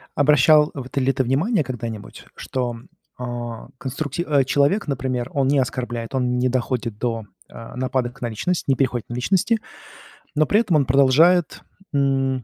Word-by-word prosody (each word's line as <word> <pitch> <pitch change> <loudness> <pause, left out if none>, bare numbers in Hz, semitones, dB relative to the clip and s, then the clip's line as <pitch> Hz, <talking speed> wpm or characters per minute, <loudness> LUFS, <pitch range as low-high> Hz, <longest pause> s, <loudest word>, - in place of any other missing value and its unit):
Обращал 150 +1 +5
в 130 -3 -6
ты 135 - -2
ли 130 +1 +3
ты 130 - 0
внимание 155 - +1
когда-нибудь, 115 -5 -7
что, 120 -3 -3 0.4
о 120 -2 -6
конструкти 140 +4 -4
о 145 -5 +2
человек, 145 +9 +2
например, 130 -2 -2
он 135 -1 +1
не 140 -1 +3
оскорбляет, 120 0 -3
он 125 -1 0
не 125 - +2
доходит 125 -3 -2
до, 115 -2 -2 0.2
э, 115 0 -10
нападок 125 -1 -2
на 120 - -2
личность, 140 +10 -2
не 135 - +4
переходит 125 -4 -1
на - - -5
личности. 185 - +1 0.8
Но 155 0 +2
при 210 - +4
этом 180 -8 0
он 145 -3 +3
продолжает 140 +7 +4 0.3
н 135 -2 +1
130 Hz, 165 wpm, -22 LUFS, 120-145 Hz, 0.8 s, Обращал